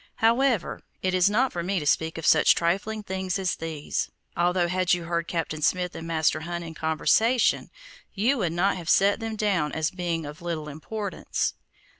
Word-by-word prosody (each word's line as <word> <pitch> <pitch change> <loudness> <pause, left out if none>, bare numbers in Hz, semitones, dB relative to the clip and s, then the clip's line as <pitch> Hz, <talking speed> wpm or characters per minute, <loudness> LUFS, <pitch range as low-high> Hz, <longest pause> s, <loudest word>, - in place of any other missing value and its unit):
However, 230 -2 +2 0.2
it 185 0 +1
is 185 +1 +4
not 245 +5 +1
for 175 - -2
me 190 +3 -1
to 150 - -5
speak 160 +2 +1
of 165 - -5
such 155 - +6
trifling 200 +6 -1
things 190 -1 -2
as 190 -2 -1
these, 160 -2 -3 0.3
although 175 +1 +2
had 180 0 +2
you 175 - -6
heard 170 0 -2
Captain 160 -2 -3
Smith 180 +3 +1
and 165 - -7
Master 160 -2 +1
Hunt 170 +2 -5
in 165 -1 -7
conversation, 220 +10 +2 0.4
you 235 +7 +1
would 175 -5 0
not 185 +3 +1
have 170 -1 -6
set 200 +2 +4
them 225 -1 -4
down 195 -8 0
as 160 0 0
being 175 -3 -2
of 150 +2 -9
little 165 -3 -4
importance. 200 +7 -3
175 Hz, 185 wpm, -26 LUFS, 165-200 Hz, 0.4 s, such